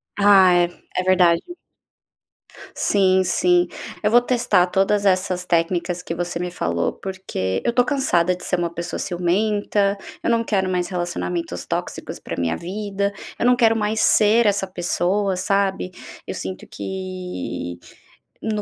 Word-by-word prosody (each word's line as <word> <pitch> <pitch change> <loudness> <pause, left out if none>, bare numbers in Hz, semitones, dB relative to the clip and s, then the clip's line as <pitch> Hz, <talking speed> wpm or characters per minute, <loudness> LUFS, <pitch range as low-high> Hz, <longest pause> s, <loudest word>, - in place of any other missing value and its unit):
Ah, 200 -3 +6
é 175 0 0
é - - 0
verdade 180 -2 +4 1.3
sim 190 -2 +3
sim. 180 -1 +2 0.3
Eu 210 - +2
vou 240 +2 +6
testar 240 -7 +2
todas 195 +2 +1
essas 185 -1 +1
técnicas 175 +1 0
que 165 - -4
você 175 0 -3
me 180 0 -3
falou, 85 - -1
porque 185 - -4
eu - - +2
estou 245 +1 +3
cansada 185 - +1
de 180 - -12
ser 180 - 0
uma 170 -1 -1
pessoa 170 +1 -5
ciumenta, 200 +3 0 0.3
eu - - -1
não 230 -1 +2
quero 195 -4 0
mais 180 -1 -1
relacionamentos 175 - -3
tóxicos - - -4
para - - -6
a - - -4
minha 85 -1 0
vida, 200 +2 -3 0.3
eu - - +1
não 250 - +6
quero 225 -2 +3
mais 215 0 0
ser 220 +2 +5
essa 200 -1 +1
pessoa, 185 +2 -1
sabe. 190 0 0 0.3
Eu - - -5
sinto 185 - -6
que 185 - -6 0.6
no 215 -1 -2
185 Hz, 150 wpm, -21 LUFS, 175-205 Hz, 1.3 s, Ah